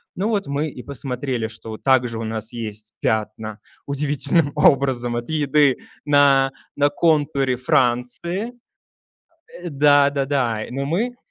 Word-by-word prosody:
Ну 200 +4 -1
вот 205 -4 -1
мы 145 +2 -1
и 130 - -9
посмотрели, 130 -2 -4
что 110 -1 -9
также 125 -3 +2
у 115 - -4
нас 110 0 -5
есть 110 -2 -6
пятна 110 0 -2 0.3
удивительным 145 +2 +1
образом 130 -5 +3
от 120 0 -4
еды 145 -3 +3 0.3
на 140 -2 +4 0.2
на 145 0 +3
контуре 145 -4 +1
Франции. 130 - 0 1.0
Э, 175 0 -7
да-да-да, 140 -5 +2
но 135 +2 -3
мы, 215 - -1
135 Hz, 120 wpm, -21 LUFS, 120-145 Hz, 1.0 s, на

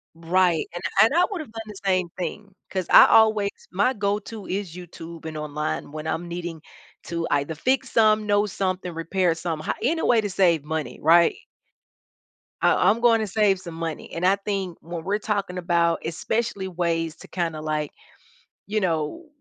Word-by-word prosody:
Right, 170 0 +1
and 175 - -6 0.2
and 225 +6 +5
I 355 - +5
would 375 -6 -4
have 270 - -10
done 225 - -6
the 210 - -9
same 185 -2 +2
thing 195 +3 -5 0.2
'cause 185 -2 -3
I - - +10
always 215 -2 +5 0.2
my 205 +8 +2
go 200 -1 0
to 215 -1 -9
is 185 -3 -4
YouTube 170 -2 -10
and 155 -1 -5
online 150 -1 -3
when 155 +1 -6
I'm 170 +2 -2
needing 170 -2 -6 0.4
to 170 -1 -3
either 145 +3 0
fix 255 - 0
some, 215 -1 +4
know 205 0 +3
something, 185 -2 -2
repair 170 +2 0
some 165 -1 -3
hi 155 - -2
any 325 +7 +1
way 235 -2 +4
to 205 - -3
save 170 -6 +3
money, 160 0 -4
right? 170 +2 +5 1.3
Uh, - - +4
I'm 220 +3 +3
gonna 230 -2 +4
save 200 -1 +2
some 170 -3 -9
money 165 -1 -5
and 170 +2 -2
I 195 +2 +5
think 195 -3 -4
when 165 0 -6
we're 200 +2 +1
talking 200 -4 -2
about 170 -1 +1
especially 200 +4 -2
ways 165 -3 -1
to - - -13
kinda 165 -4 -2
like, 155 -1 -2 0.7
you 215 +1 0
know, 170 - -2
180 Hz, 180 wpm, -24 LUFS, 165-205 Hz, 1.3 s, I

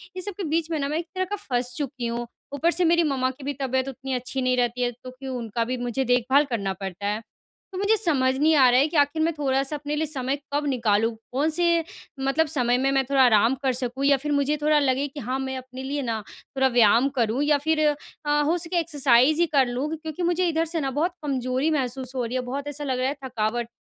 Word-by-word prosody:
ये 370 - -4
सब 405 +2 -3
के 400 - -4
बीच 325 +1 0
में 315 - 0
ना 280 - -1
मैं 305 - -1
एक 340 - -6
तरह 370 0 0
का 410 +3 -3
फँस 245 -1 0
चुकी 265 -4 -3
हूँ। 235 +1 -3 0.3
ऊपर 320 +4 +2
से 355 +1 +1
मेरी 340 +1 +4
मम्मा 265 -4 0
की 265 +2 -14
भी 285 +1 -2
तबियत 260 0 0
उतनी 265 0 -6
अच्छी 255 +1 -3
नहीं 255 0 +1
रहती 245 0 0
है 245 0 +1
तो 255 - -8
क्यों 260 0 -7
उनका 230 -1 -2
भी 255 +2 -2
मुझे 245 +2 -2
देखभाल 250 +4 +3
करना 200 -5 -1
पड़ता 190 +1 -5
है। 210 +2 -1 0.5
तो - - -5
मुझे 405 +3 +3
समझ 275 -10 +2
नहीं 310 +3 +4
आ 265 -3 +6
रहा 250 - +5
है 280 - +4
कि 315 - -2
आखिर 290 +2 +2
मैं 335 +1 +1
थोड़ा-सा 270 +1 0
अपने 295 0 -4
लिए 310 +1 0
समय 270 -2 -2 0.2
कब 295 +1 0
निकालूँ? 225 -4 +2 0.2
कौन-से 330 +5 +2 0.4
मतलब 275 +4 +1
समय 245 -4 +1
में 265 +2 +1
मैं 270 0 +2
थोड़ा 275 +1 +2
आराम 235 +1 +4
कर 260 -1 +2
सकूँ? 250 +2 -2
या 280 0 +5
फिर 295 +3 -4
मुझे 285 +1 +1
थोड़ा 300 0 +4
लगे 275 0 +1
कि 285 +1 -9
हाँ 255 +1 -2
मैं 265 0 -3
अपने 260 0 -8
लिए 285 +2 -2
ना 230 -4 -2 0.4
थोड़ा 265 0 +4
व्यायाम 240 +1 +4
करूँ 235 +4 +1
या 295 0 +3
फिर 320 -1 +3
अ, 295 0 -2
हो 315 +4 +1
सके 345 +1 -1
एक्सरसाइज़ 290 -2 +3
ही - - +5
कर 265 -2 +5
लूँ। 245 +4 -2
क्योंकि 320 +2 -6
मुझे 350 +1 +1
इधर 325 0 +1
से 330 0 -2
ना 270 -1 -1
बहुत 330 +6 0
कमजोरी 260 +1 0
महसूस 260 -2 -2
हो 250 -2 -1
रही 235 +2 -4
है। 255 - +1
बहुत 280 +2 -4
ऐसा 290 0 -5
लग 260 -3 -1
रहा 255 - +1
है 285 - -3
थकावट 235 -1 -2
270 Hz, 250 wpm, -25 LUFS, 250-300 Hz, 0.5 s, आ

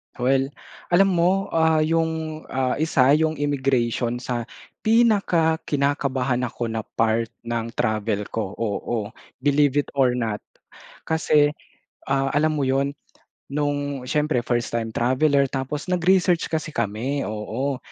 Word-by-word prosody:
Well 135 +2 +2 0.5
alam 195 +1 +5
mo, 185 +3 +1
ah, 160 -1 +3
yung, 160 -1 -1
ah, 130 +1 -1
isa 140 -4 +3
yung 160 0 +1
immigration 130 -4 0
sa 120 -2 -3 0.3
pinaka 200 -8 +3
kinakabahan 135 -3 0
ako 115 -1 -4
na 110 - -2 0.2
part 115 0 +2 0.2
ng 115 -1 -2
travel 110 -2 0
ko, 105 -3 -3
oo, 110 0 -3 0.3
believe 145 -1 +3
it - - -15
or 125 -2 +4
not. 110 -4 -2 0.7
Kasi, 150 -2 +3 0.6
ah, 135 0 +2
alam 155 +1 +2
mo 135 - +1
yun 135 +1 +1 0.6
nung 145 -2 -2
syempre 150 -1 0
first 120 -1 -1
time 115 -1 -2
traveler 140 +4 +2
tapos 135 +3 -4
nag-research 180 -1 +2
kasi 155 -1 -3
kami, 115 +6 -2
oo. 115 +6 -3
135 Hz, 125 wpm, -23 LUFS, 120-155 Hz, 0.7 s, alam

